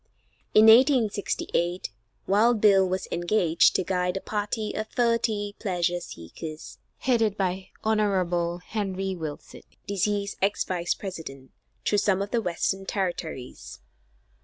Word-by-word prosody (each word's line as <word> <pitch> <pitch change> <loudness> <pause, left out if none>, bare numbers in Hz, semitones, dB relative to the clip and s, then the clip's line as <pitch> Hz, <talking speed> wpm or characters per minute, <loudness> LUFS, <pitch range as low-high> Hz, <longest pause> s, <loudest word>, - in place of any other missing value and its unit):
In 215 - +8
1868, 220 - +3 0.3
Wild 220 +4 +3
Bill 195 -3 +5
was 185 +1 -2
engaged 175 -1 +3
to 185 - +2
guide 180 0 -1
a - - -2
party 210 +2 -3
of 215 0 -3
thirty 220 -4 0
pleasure 175 -3 0
seekers, 155 - -9 0.2
headed 225 -5 +1
by 190 -1 -2
Hon. 180 -5 0
Henry 195 -3 -3
Wilson, 155 -4 -7 0.2
deceased 200 +1 -1
ex 200 +2 +1
Vice 175 -1 -1
President, 155 -9 -8 0.3
through 205 - +3
some 195 -2 +2
of 205 - -8
the 235 - +1
Western 190 +1 -2
territories. 175 -9 -4
195 Hz, 120 wpm, -26 LUFS, 175-210 Hz, 0.3 s, In